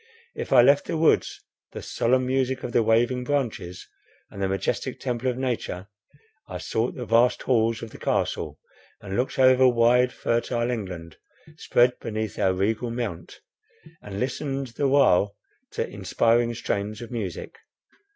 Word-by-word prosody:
If - - -6
I 125 -3 +7
left 140 +3 +4
the - - -2
woods, 160 0 +2 0.3
the - - -7
solemn 130 +2 +1
music 130 0 -1
of 120 - -4
the 120 - +3
waving 120 +3 +2
branches, 115 -11 -3 0.4
and 100 - -8
the 95 - +1
majestic 95 0 -2
temple 125 0 -2
of 125 - -3
nature, 115 -7 -3 0.6
I - - -6
sought 115 +2 -2
the 125 - -5
vast 115 +2 +3
halls 115 -3 +1
of 115 - -8
the - - -12
Castle, - - -2 0.4
and 95 -1 -6
looked 125 +4 -1
over 130 0 +6
wide, 125 +1 +4
fertile 120 +1 -1
England, 90 -8 -6 0.4
spread 125 -5 +2
beneath 110 -1 -4
our 95 - +3
regal 110 +5 -1
mount, 115 -8 -5 0.6
and 100 -1 -7
listened 135 +1 -3
the 140 +5 -1
while 105 -7 +3 0.4
to - - -2
inspiring 115 +1 +1
strains 105 +2 -3
of 115 - -10
music. 105 -7 -5
120 Hz, 150 wpm, -25 LUFS, 105-130 Hz, 0.6 s, I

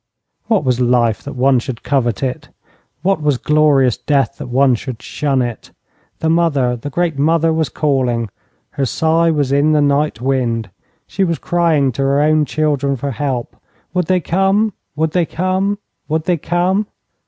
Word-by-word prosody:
What 215 -8 +2
was 125 -2 0
life 120 -3 +2
that 140 - -8
one 130 0 +3
should 120 -1 -6
covet 120 -5 0
it? 130 -1 -3 0.5
What 190 -3 +1
was 145 -3 +1
glorious 145 -4 +3
death 140 -3 0
that - - -6
one 130 +1 +3
should 125 0 -5
shun 135 0 -1
it? 120 -2 -6 0.5
The 160 - 0
mother, 155 -7 +2
the 120 +4 -6
great 165 0 -1
mother, 165 +2 +2
was 160 -4 0
calling. 125 -7 0 0.4
Her 140 - -1
sigh 165 +5 +2
was 145 -4 0
in 145 +2 +3
the 150 - +3
night 145 -2 +1
wind. 120 -5 -1 0.3
She 195 - -2
was 170 -3 0
crying 160 -5 +1
to 130 - -4
her 135 +1 +2
own 155 0 +3
children 145 -2 0
for 140 +2 -4
help. 130 -2 -3 0.4
Would 180 -3 0
they 185 -1 +2
come? 195 +5 +1 0.2
Would 160 0 0
they 175 -1 +1
come? 185 +3 -1 0.3
Would 160 0 -1
they 175 0 +1
come? 180 +6 0
145 Hz, 170 wpm, -17 LUFS, 130-165 Hz, 0.5 s, one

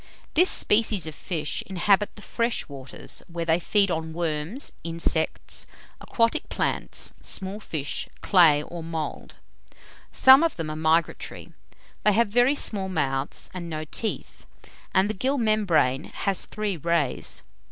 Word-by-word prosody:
This 355 +4 +5
species 210 -5 +3
of 155 - -5
fish 155 -1 -3
inhabit 195 +2 +2
the 210 - -12
fresh 235 0 -1
waters, 135 -2 -9
where 170 -1 -4
they 165 +1 +3
feed 195 +2 +2
on 160 -1 -3
worms, 165 - -3
insects, 165 -1 -1 0.3
aquatic 230 -1 0
plants, - - -1
small 195 +2 -2
fish, 155 -8 -4
clay, 160 -6 +5
or 170 +1 -8
mould. 160 -1 -5 0.8
Some 265 +2 +8
of 335 -1 +1
them 160 -2 -4
are - - -5
migratory. 160 +1 -1 0.5
They 210 - +4
have 230 +1 +3
very 245 +6 +4
small 195 -8 -1
mouths 135 -5 -2
and 175 -2 -6
no 155 -1 -4
teeth, 220 +8 -3 0.4
and 190 +1 +3
the 215 - -2
gill 265 +8 0
membrane 190 - +2
has 195 -2 -2
three 210 -4 -3
rays. 165 -4 -1
175 Hz, 140 wpm, -25 LUFS, 160-210 Hz, 0.8 s, Some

